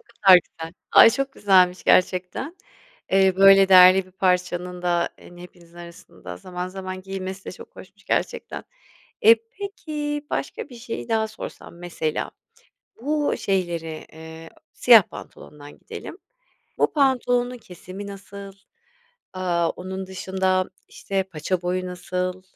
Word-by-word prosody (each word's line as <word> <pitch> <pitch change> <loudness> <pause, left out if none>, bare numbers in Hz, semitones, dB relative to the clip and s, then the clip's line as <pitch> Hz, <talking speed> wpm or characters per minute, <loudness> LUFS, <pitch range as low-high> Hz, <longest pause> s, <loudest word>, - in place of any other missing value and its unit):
o - - -25
kadar 190 - +5
güzel. 165 0 -10 0.2
Ay, 225 - +9
çok 275 +3 -3
güzelmiş 185 -5 +3
gerçekten. 185 - +1 0.5
Eee, 190 -1 +3
böyle 195 0 +7
değerli 185 0 +7
bir - - -19
parçanın 180 -1 -1
da, 175 -1 +1
hani, 175 0 -14
hepinizin 175 -1 -16
arasında 95 - -11
zaman 180 - -6
zaman 185 0 -7
giyilmesi 190 0 -6
de - - -7
çok - - -14
hoşmuş - - -15
gerçekten. - - -3 0.6
Eee, 225 +1 +8 0.2
peki, 300 -7 -5
başka - - -4
bir 250 - -13
şeyi 230 0 -7
daha 220 -1 0
sorsam 170 - -10
mesela 165 -3 -4 0.7
bu 295 +1 0
şeyleri, 170 -5 -3
eee, 160 +1 -11 0.2
siyah 230 -4 +7
pantolondan 145 -3 -13
gidelim. - - -10 0.6
Bu - - +2
pantolonun 250 -3 +1
kesimi 185 0 -10
nasıl? 200 0 -10 0.8
Aaa, 175 -3 -1
onun 190 +1 -7
dışında, 190 0 -1 0.2
işte, 195 -1 -3
paça 180 0 -4
boyu 185 +1 -2
nasıl? 180 +1 -4
185 Hz, 130 wpm, -23 LUFS, 180-200 Hz, 0.8 s, Ay